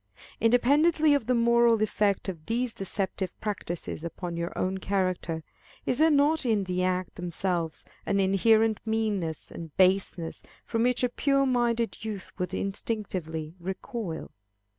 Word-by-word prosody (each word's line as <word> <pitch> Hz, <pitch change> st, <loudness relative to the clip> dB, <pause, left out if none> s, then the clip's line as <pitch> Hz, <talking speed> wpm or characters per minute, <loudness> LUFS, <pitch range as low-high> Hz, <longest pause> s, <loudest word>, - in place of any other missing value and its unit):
Independently 290 Hz, +7 st, +4 dB
of 280 Hz, -6 st, 0 dB
the 250 Hz, -, +3 dB
moral 235 Hz, -1 st, +4 dB
effect 205 Hz, -2 st, +1 dB
of 165 Hz, -5 st, -6 dB
these 235 Hz, +1 st, 0 dB
deceptive 190 Hz, -1 st, -3 dB
practices 175 Hz, -6 st, -4 dB
upon 170 Hz, +1 st, -5 dB
your 170 Hz, 0 st, -3 dB
own 190 Hz, +1 st, -1 dB
character, 185 Hz, -4 st, -1 dB, 0.4 s
is 250 Hz, -, 0 dB
there 320 Hz, +1 st, +6 dB
not 295 Hz, +2 st, +3 dB
in 220 Hz, -5 st, +2 dB
the 180 Hz, -1 st, -1 dB
acts 185 Hz, 0 st, -1 dB
themselves 175 Hz, -2 st, -2 dB, 0.2 s
an 200 Hz, -, +2 dB
inherent 215 Hz, +3 st, +3 dB
meanness 210 Hz, -8 st, -2 dB
and 165 Hz, -3 st, -9 dB
baseness, 185 Hz, -3 st, +2 dB, 0.2 s
from 225 Hz, -1 st, -1 dB
which 250 Hz, +1 st, +2 dB
a 250 Hz, -, +3 dB
pure 275 Hz, +2 st, +2 dB
minded 235 Hz, -3 st, 0 dB
youth 210 Hz, -3 st, -5 dB
would 180 Hz, -1 st, -2 dB
instinctively 185 Hz, -6 st, -3 dB
recoil? 190 Hz, 0 st, -5 dB
200 Hz, 140 wpm, -28 LUFS, 180-235 Hz, 0.4 s, there